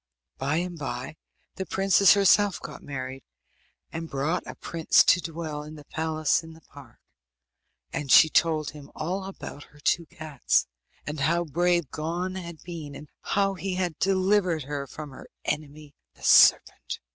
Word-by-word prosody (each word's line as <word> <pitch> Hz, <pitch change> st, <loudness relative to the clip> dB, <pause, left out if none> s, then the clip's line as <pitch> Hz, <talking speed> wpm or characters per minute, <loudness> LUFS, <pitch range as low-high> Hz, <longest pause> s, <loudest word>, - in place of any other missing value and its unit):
By 140 Hz, +3 st, 0 dB
and 175 Hz, 0 st, -3 dB
bye 130 Hz, 0 st, -5 dB, 0.4 s
the 190 Hz, -, -3 dB
princess 195 Hz, 0 st, +5 dB
herself 200 Hz, 0 st, +4 dB
got -, -, -9 dB
married, 130 Hz, -1 st, -6 dB, 0.7 s
and 165 Hz, 0 st, -6 dB
brought 150 Hz, +6 st, -1 dB
a -, -, -7 dB
prince 165 Hz, -2 st, +3 dB
to 180 Hz, -, +4 dB
dwell 160 Hz, -3 st, -5 dB
in 150 Hz, +1 st, -10 dB
the 150 Hz, -1 st, -13 dB
palace 155 Hz, 0 st, 0 dB
in 160 Hz, 0 st, -12 dB
the 160 Hz, -, -16 dB
park. 140 Hz, -5 st, -16 dB, 1.0 s
And 140 Hz, -2 st, -3 dB
she 160 Hz, -, +9 dB
told 155 Hz, -1 st, +1 dB
him 145 Hz, -1 st, -12 dB
all 185 Hz, +5 st, -3 dB
about 185 Hz, -6 st, -9 dB
her 145 Hz, -, -21 dB
two 165 Hz, +3 st, +1 dB
cats, 155 Hz, -5 st, 0 dB, 0.4 s
and 150 Hz, 0 st, -5 dB
how 170 Hz, +5 st, +2 dB
brave 170 Hz, -1 st, 0 dB
Gon 170 Hz, +4 st, -3 dB
had 170 Hz, -4 st, -8 dB
been, 160 Hz, -5 st, -8 dB
and 150 Hz, +1 st, -11 dB
how 195 Hz, -1 st, +1 dB
he 185 Hz, 0 st, -4 dB
had 180 Hz, -4 st, -2 dB
delivered 185 Hz, -4 st, +2 dB
her 140 Hz, 0 st, -5 dB
from 150 Hz, +3 st, -9 dB
her 130 Hz, -, -12 dB, 0.2 s
enemy 150 Hz, 0 st, -4 dB, 0.2 s
the -, -, -19 dB
serpent. -, -, +5 dB
160 Hz, 160 wpm, -26 LUFS, 145-180 Hz, 1.0 s, she